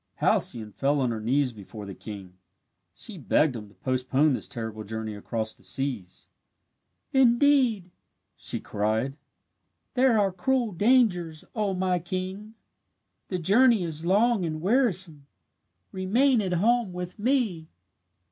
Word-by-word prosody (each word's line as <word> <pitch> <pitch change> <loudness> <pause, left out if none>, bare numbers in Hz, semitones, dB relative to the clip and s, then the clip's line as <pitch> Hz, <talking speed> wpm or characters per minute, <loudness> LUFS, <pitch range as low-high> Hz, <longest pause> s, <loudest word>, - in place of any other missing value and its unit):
Halcyone 110 -3 0
fell 140 +6 0
on 125 -3 +1
her 115 - -3
knees 125 +3 +1
before 105 0 -10
the 100 - -7
king. 100 -3 -9 0.6
She 200 - -8
begged 150 -1 +2
him 105 -2 -7
to 100 - -22
postpone 130 +7 +1
this - - -3
terrible 110 -5 -5
journey 110 +1 -5
across 110 +1 -4
the - - -21
seas. 100 -1 -4 0.9
"Indeed," 250 -6 +3 0.7
cried 110 +5 -1
she, - - -27 0.8
"there 250 -3 +4
are 195 -2 +2
cruel 240 +5 0
dangers, 180 -6 +2
O 210 -4 -1
my 180 -1 0
king! 185 +5 -5 0.7
The 185 - -2
journey 215 +4 +4
is 160 -2 -3
long 205 +4 +3
and 155 -2 -3
wearisome. 185 - 0 0.6
Remain 230 +7 +2
at 185 -3 -2
home 220 +2 +2
with 180 +3 -6
me!" 215 - 0
175 Hz, 130 wpm, -26 LUFS, -, 0.9 s, there